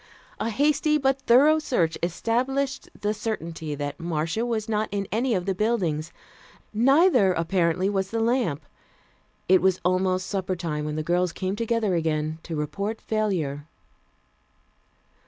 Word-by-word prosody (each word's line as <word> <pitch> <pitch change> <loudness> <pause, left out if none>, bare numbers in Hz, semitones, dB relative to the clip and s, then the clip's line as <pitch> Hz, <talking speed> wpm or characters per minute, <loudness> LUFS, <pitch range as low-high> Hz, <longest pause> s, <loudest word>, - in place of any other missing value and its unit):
A 225 - -1
hasty 300 +5 +2
but 270 -1 +1
thorough 290 +6 +6
search 175 - 0
established 260 +10 -1
the 210 +1 0
certainty 165 -8 -4
that 145 0 -5
Marcia 165 +5 -1
was 220 -3 -2
not 215 -1 -1
in 200 -1 -2
any 230 +3 +1
of 180 -1 -2
the 195 - 0
buildings. 180 -7 -1 0.6
Neither, 255 - +4
apparently, 170 +1 +1
was 195 -1 -1
the 230 - -2
lamp. 225 - 0 0.8
It 185 0 +5
was 190 -1 +2
almost 185 0 +1
supper 190 -1 -2
time 155 -4 -3
when 150 0 -3
the 155 - -2
girls 175 +2 +1
came 185 +2 -3
together 230 -2 0
again 155 -1 -1
to 165 - -6
report 200 +9 -3
failure. 170 -10 -2
190 Hz, 140 wpm, -25 LUFS, 165-230 Hz, 0.8 s, thorough